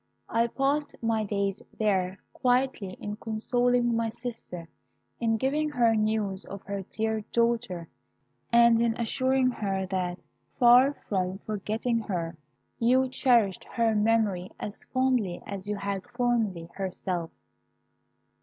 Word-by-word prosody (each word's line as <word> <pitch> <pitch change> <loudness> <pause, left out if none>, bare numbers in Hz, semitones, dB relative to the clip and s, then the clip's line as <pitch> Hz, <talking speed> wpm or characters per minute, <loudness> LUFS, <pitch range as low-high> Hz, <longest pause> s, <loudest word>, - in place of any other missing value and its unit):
I 230 +1 +2
passed 280 +4 0
my 225 -1 +1
days 200 -2 -1 0.2
there 190 -3 +1 0.2
quietly 250 -6 +1
in 210 0 -5
consoling 240 +2 +1
my 230 0 0
sister, 225 -8 -7 0.5
in 225 -1 +1
giving 295 +6 0
her 235 -5 +3
news 215 -3 0
of 200 0 -9
her 200 0 -4
dear 220 0 -1
daughter, 230 -8 0 0.6
and 235 -1 +6
in 230 -1 +2
assuring 260 +2 +2
her 195 -4 -2
that, 180 -1 -2 0.3
far 250 +3 +6
from 185 -2 -1
forgetting 220 +3 -1
her, 175 -6 -3 0.4
you 255 +3 +3
cherished 240 -7 +2
her 230 -2 +1
memory 210 -4 +2
as 205 - -5
fondly 255 -8 +1
as 200 0 -6
you 210 - 0
had 200 +2 -4
formerly 235 -8 0
herself. 185 -3 -3
220 Hz, 125 wpm, -28 LUFS, 195-245 Hz, 0.6 s, and